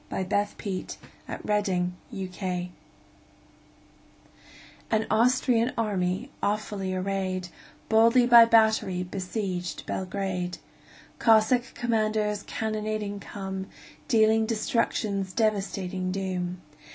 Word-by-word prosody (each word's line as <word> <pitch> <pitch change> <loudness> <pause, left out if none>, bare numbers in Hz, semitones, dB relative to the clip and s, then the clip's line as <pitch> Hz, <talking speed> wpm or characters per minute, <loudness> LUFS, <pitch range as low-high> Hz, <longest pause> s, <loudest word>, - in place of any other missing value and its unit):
Y - - -2
Z 180 - -8
The 205 0 +2 0.2
Siege 195 -4 -4 0.3
of - - -6
Belgrade 180 -2 -2 2.2
AN 220 0 +1
Austrian 240 +1 +3
army, 205 +2 -1
awfully 205 -2 -1
arrayed, 185 -1 -2 0.4
Boldly 230 +3 +5
by 235 -1 +9
battery 220 -5 +3
besieged 185 -1 -4
Belgrade. 185 -2 -3 0.6
Cossack 230 +2 +3
commanders 215 -3 0
cannonading 215 -2 -3
come, 190 -1 -6 0.4
Dealing 220 -3 +4
destruction's 215 -3 -1
devastating 195 -4 -1
doom. 185 -2 -3
205 Hz, 85 wpm, -27 LUFS, 185-220 Hz, 2.2 s, by